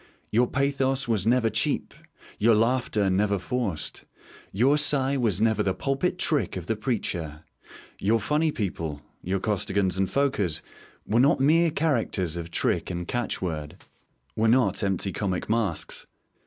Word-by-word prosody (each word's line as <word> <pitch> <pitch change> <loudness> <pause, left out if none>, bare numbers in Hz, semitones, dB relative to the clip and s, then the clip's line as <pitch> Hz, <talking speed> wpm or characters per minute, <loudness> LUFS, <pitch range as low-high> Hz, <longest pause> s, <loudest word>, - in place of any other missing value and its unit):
Your 120 +3 +3
pathos 135 -1 0
was 110 -4 0
never 115 -2 +3
cheap, 110 +1 0 0.5
your 115 +1 +5
laughter 115 -2 +1
never 100 +2 +1
forced; 105 -5 -3 0.5
your 125 +9 +3
sigh 140 -2 +3
was 115 -8 +1
never 110 -1 +2
the 95 -2 0
pulpit 135 - -1
trick 150 - 0
of 90 - -6
the 110 - -1
preacher. 85 - -3 0.6
Your 110 +3 +2
funny 150 +6 +1
people 85 - -4 0.2
your 95 +2 -1
Costigans 95 -2 0
and 95 - +1
Fokers 105 - 0 0.4
were 110 +3 +1
not 135 +2 +4
mere 165 +5 +4
characters 120 - -1
of 85 -1 -5
trick - - 0
and 85 -1 -4
catch 120 -5 -2
word, 75 -4 -4 0.6
were 110 - +2
not 110 -5 +3
empty 95 -1 -1
comic 95 -3 -2
masks. 105 -7 -2
110 Hz, 145 wpm, -26 LUFS, 95-130 Hz, 0.6 s, your